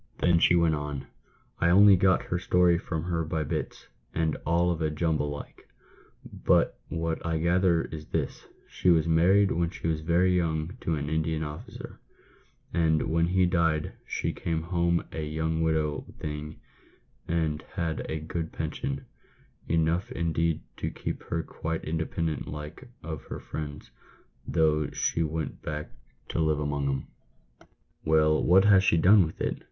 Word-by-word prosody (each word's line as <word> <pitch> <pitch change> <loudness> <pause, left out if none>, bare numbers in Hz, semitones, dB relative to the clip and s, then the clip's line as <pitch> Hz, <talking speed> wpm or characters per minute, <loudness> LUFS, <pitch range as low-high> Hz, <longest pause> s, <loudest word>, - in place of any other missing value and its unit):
Then 85 -1 +3
she 90 - +5
went 85 -2 +3
on, 75 -2 -4 0.3
" - - -36
I 85 - +4
only 100 +3 +8
got 95 0 +3
her 85 - -2
story 90 -1 +3
from 80 -2 -4
her 85 -1 -1
by 80 0 -2
bits, 70 - -4 0.3
and 80 -2 +1
all 85 +2 +3
of 85 -1 -3
a 80 - +1
jumble 75 -1 0
like; 70 0 -9 0.6
but - - +1
what 80 -1 -2
I 80 -1 0
gather 85 +1 +2
is 75 -1 -8
this: - - -3 0.2
She - - 0
was 80 -3 +5
married 95 +5 +4
when 85 0 +1
she 85 - -9
was 80 -2 0
very 90 +3 +3
young 80 +1 -1
to 80 - 0
an 70 -1 -3
Indian 80 +1 -1
officer, 75 0 -8 0.7
and 80 -2 +2
when 85 +1 +2
he 90 +1 +3
died 85 -3 +1
she - - -2
came 80 -1 -2
home 85 0 +1
a 80 - -4
young 80 +1 -1
widow 80 -2 0
thing, 75 0 -6 0.7
and 80 -2 0
had 85 -5 -2
a 80 - -2
good 80 0 -4
pension 70 -3 -4 0.3
— - - -32
enough, 80 +3 +1
indeed, 85 -1 0 0.2
to - - -2
keep - - -5
her 80 0 -2
quite 80 0 -4
independent 80 0 -2
like 75 - -8
of 80 -3 -5
her - - -6
friends, 75 -1 -7 0.6
though 75 -1 +2
she 85 - -1
went 80 0 -3
back 75 0 -5 0.4
to - - -2
live 80 -2 +2
among 70 -1 -1
'em." 70 0 -2 0.8
" - - -43
Well, 75 0 +3
what 95 +3 +5
has 100 -2 +6
she 85 - +3
done 95 +2 +6
with 80 - -11
it - - -1
80 Hz, 165 wpm, -28 LUFS, 75-85 Hz, 0.8 s, only